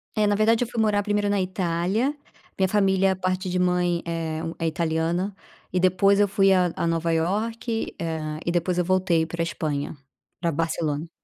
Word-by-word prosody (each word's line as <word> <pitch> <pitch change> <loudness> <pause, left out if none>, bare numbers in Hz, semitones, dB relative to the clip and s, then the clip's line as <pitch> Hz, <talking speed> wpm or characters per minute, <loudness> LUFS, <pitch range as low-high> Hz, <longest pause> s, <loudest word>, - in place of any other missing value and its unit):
É, 215 -1 +3
na 205 - +2
verdade, 220 +3 +3
eu 240 - -4
fui 235 -2 -2
morar 205 -2 +2
primeiro 205 -1 0
na 200 -1 +1
Itália. 185 - 0 0.4
Minha 190 -1 +3
família 190 -1 +2
parte 185 0 -2
de 180 0 0
mãe 180 -1 +1
é 165 -1 -3
hum, 165 - -4
é 165 - 0
italiana. 165 +4 -1 0.4
E 180 - +1
depois 185 +2 +4
eu 205 - +4
fui 195 0 +3
a 180 -2 +3
a 170 - -1
Nova 165 0 0
Iorque, 225 +7 -1
eh, 155 -2 -3
e 170 - +1
depois 175 +1 0
eu 180 - +2
voltei 185 -3 +2
pra 170 +1 -3
Espanha, 150 -3 -3 0.5
pra 170 -2 +1
Barcelona. 160 0 -2
180 Hz, 185 wpm, -24 LUFS, 165-200 Hz, 0.5 s, depois